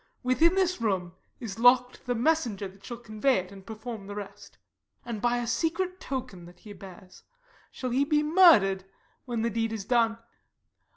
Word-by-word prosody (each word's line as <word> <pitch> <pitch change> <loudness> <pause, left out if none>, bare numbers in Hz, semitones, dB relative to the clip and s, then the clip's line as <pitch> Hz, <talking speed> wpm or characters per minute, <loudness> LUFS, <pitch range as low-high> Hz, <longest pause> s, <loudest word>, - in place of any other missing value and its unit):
Within 315 +8 +3
this 365 -7 +1
room 185 -6 -1 0.3
is 225 -3 -7
lock'd 250 +1 +3
the 245 - 0
messenger 235 -7 0
That 195 +1 -18
shall 240 - -7
convey 235 +3 0
it, 185 0 -5
and 195 -1 -12
perform 220 -1 -8
the 205 - -7
rest; 205 -1 -9 0.5
And, 230 -3 -5
by 240 +1 +1
a 240 - -2
secret 335 +9 -1
token 240 -10 -6
that 175 0 -16
he 210 - -10
bears, 185 -1 -13 0.5
Shall 255 -2 -5
he 265 +3 +2
be 300 +1 +1
murder'd 300 - +5 0.4
when 235 -3 -2
the 235 - 0
deed 225 +1 -1
is 215 -3 -5
done. 230 -1 +2
235 Hz, 175 wpm, -27 LUFS, 200-260 Hz, 0.5 s, murder'd